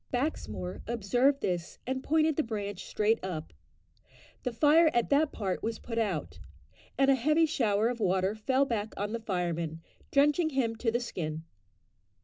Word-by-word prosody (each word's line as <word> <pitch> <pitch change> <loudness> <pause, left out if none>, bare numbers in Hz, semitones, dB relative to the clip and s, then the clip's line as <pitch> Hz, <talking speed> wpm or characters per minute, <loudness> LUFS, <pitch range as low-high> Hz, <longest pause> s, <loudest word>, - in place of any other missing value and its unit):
Baxmore 105 - -3
observed 245 +5 +2
this; 175 -2 -2
and 260 +1 -2
pointed 315 0 +2
the 310 - +2
branch 205 - -4
straight 215 0 +1
up. 160 - -5 0.9
The 250 - -2
fire 310 +6 +5
at 240 +2 +1
that 290 +1 +3
part 190 -4 -3
was 225 0 -2
put 230 -1 -4
out, 150 - -2 0.6
and 270 +1 +5
a - - +6
heavy 305 +6 +3
shower 225 -8 +1
of 240 0 -2
water 190 -1 +1
fell 260 +6 +1
back 220 -4 -3
on 205 +1 -2
the 230 - -2
fireman, 170 -6 -3 0.3
drenching 295 +4 +3
him 255 -6 0
to 230 - 0
the 240 - +1
skin. 160 -9 -4
230 Hz, 160 wpm, -30 LUFS, 190-275 Hz, 0.9 s, a